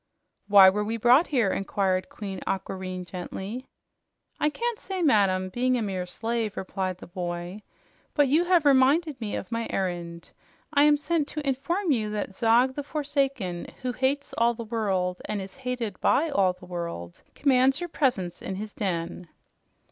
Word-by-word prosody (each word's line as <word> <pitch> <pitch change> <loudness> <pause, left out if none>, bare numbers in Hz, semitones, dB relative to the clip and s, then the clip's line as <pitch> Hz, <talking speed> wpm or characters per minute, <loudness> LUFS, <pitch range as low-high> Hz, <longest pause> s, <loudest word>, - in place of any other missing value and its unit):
"Why 200 -2 +9
were 205 +2 +3
we 225 +2 -2
brought 250 +8 +5
here?" 240 -9 +2
inquired 190 -1 0
Queen 195 -3 -6
Aquareine 185 -1 -3
gently. 190 +7 -6 0.7
"I 300 - +3
can't 470 +7 -3
say, 380 -2 -3
madam, 195 - +3
being 250 +5 +1
a 230 - -1
mere 185 -3 -3
slave," 225 +1 -2
replied 185 -1 -3
the - - -11
boy. 175 +2 -5 0.5
"But 290 -2 +4
you 310 +6 +3
have 350 -4 +3
reminded 280 +2 +4
me 210 -2 -3
of 195 - -6
my 230 0 -2
errand. 175 -3 -3 0.4
I 285 0 +6
am 300 0 +5
sent 300 0 0
to 300 -2 -5
inform 340 +7 0
you 225 -6 +1
all 210 - -5
that 205 -2 -3
Zog 235 +4 +3
the 290 - -3
Forsaken, 275 - -2 0.2
who 250 - 0
hates 265 +4 -1
all 235 +1 +3
the 230 - -6
world 195 -5 -1
and 210 - -2
is 195 +3 -8
hated 250 -6 -4
by 320 +2 +2
all 190 -8 +3
the 180 0 -15
world, 170 - -6
commands 270 0 +3
your 350 -1 -4
presence 240 - 0
in 190 - -4
his 210 +2 -6
den." 175 -2 -3
225 Hz, 170 wpm, -26 LUFS, 185-275 Hz, 0.7 s, Why